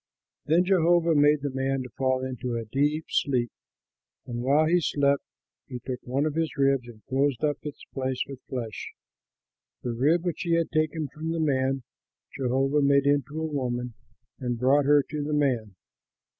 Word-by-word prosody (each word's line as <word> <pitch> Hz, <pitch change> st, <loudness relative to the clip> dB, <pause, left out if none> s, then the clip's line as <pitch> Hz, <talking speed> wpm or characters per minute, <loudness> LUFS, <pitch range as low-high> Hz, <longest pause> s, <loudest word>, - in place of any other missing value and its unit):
Then 170 Hz, +4 st, +4 dB
Jehovah 175 Hz, -2 st, +3 dB
made 145 Hz, 0 st, +4 dB
the 145 Hz, -, -1 dB
man 135 Hz, 0 st, -1 dB
fall 130 Hz, -1 st, 0 dB
into 125 Hz, -1 st, -4 dB
a 115 Hz, -, -4 dB
deep 145 Hz, +7 st, 0 dB
sleep; 125 Hz, -4 st, +1 dB, 0.7 s
and 120 Hz, -2 st, -4 dB
while 140 Hz, +5 st, +3 dB
he 175 Hz, +2 st, +3 dB
slept, 140 Hz, -2 st, +2 dB, 0.5 s
he 125 Hz, -, -6 dB
took 125 Hz, +1 st, -5 dB
one 135 Hz, +4 st, -1 dB
of 155 Hz, -, -1 dB
his 160 Hz, -1 st, -2 dB
ribs 135 Hz, -3 st, +2 dB
and 110 Hz, -3 st, -14 dB
closed 135 Hz, 0 st, 0 dB
up 145 Hz, -2 st, +1 dB
its 150 Hz, -1 st, -8 dB
place 130 Hz, -1 st, -2 dB
with 135 Hz, -2 st, -9 dB
flesh. 115 Hz, -5 st, -5 dB, 0.9 s
The 120 Hz, -, -2 dB
rib 155 Hz, +9 st, +2 dB
which 175 Hz, -, -2 dB
he 170 Hz, -1 st, +1 dB
had 165 Hz, -1 st, 0 dB
taken 155 Hz, 0 st, 0 dB
from 155 Hz, +4 st, -6 dB
the 165 Hz, 0 st, -1 dB
man, 135 Hz, -3 st, +1 dB, 0.5 s
Jehovah 135 Hz, +2 st, +1 dB
made 140 Hz, 0 st, +4 dB
into 145 Hz, +1 st, +1 dB
a 160 Hz, -, -1 dB
woman 125 Hz, -5 st, -2 dB, 0.5 s
and 125 Hz, -2 st, -2 dB
brought 135 Hz, +4 st, +3 dB
her 145 Hz, 0 st, +5 dB
to 150 Hz, +1 st, -5 dB
the 150 Hz, +1 st, -2 dB
man. 125 Hz, -9 st, 0 dB
140 Hz, 170 wpm, -27 LUFS, 130-150 Hz, 0.9 s, her